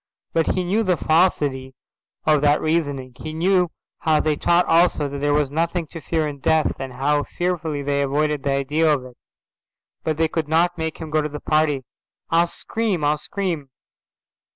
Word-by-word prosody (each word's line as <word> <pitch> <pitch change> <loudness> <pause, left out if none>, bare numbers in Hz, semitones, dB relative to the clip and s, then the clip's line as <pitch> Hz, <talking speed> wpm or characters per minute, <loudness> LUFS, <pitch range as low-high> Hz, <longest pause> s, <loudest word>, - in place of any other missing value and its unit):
But 165 -1 +1
he 185 - 0
knew 195 +6 +1
the 185 -5 +1
falsity 145 -6 +1 0.5
of 155 -2 +4
that 145 0 +4
reasoning; 145 -5 -1
he 155 - -6
knew 180 +2 +2 0.3
how 155 -2 +2
they 155 -1 +1
taught 175 +4 +3
also 165 -3 +3
that 140 0 -5
there 145 +1 +1
was 145 -2 +1
nothing 170 +2 -1
to 165 - -8
fear 160 -1 -1
in 145 -1 -6
death, 160 +2 +2
and 135 -1 -5
how 145 +3 +1
fearfully 165 -3 -2
they 140 0 0
avoided 145 +1 0
the 140 - -2
idea 145 +4 +2
of 135 -4 0
it. 125 -1 -13 0.9
But 155 -2 -1
they 160 0 +2
couldn't 160 +2 +1
make 160 -1 -3
him 160 -2 -7
go 155 0 +2
to 150 - -3
the 150 0 -6
party. 155 -3 +1 0.5
"I'll 170 +1 +4
scream. 205 -2 -2
I'll 150 +1 +2
scream." 175 -8 -3
155 Hz, 180 wpm, -22 LUFS, 145-170 Hz, 0.9 s, of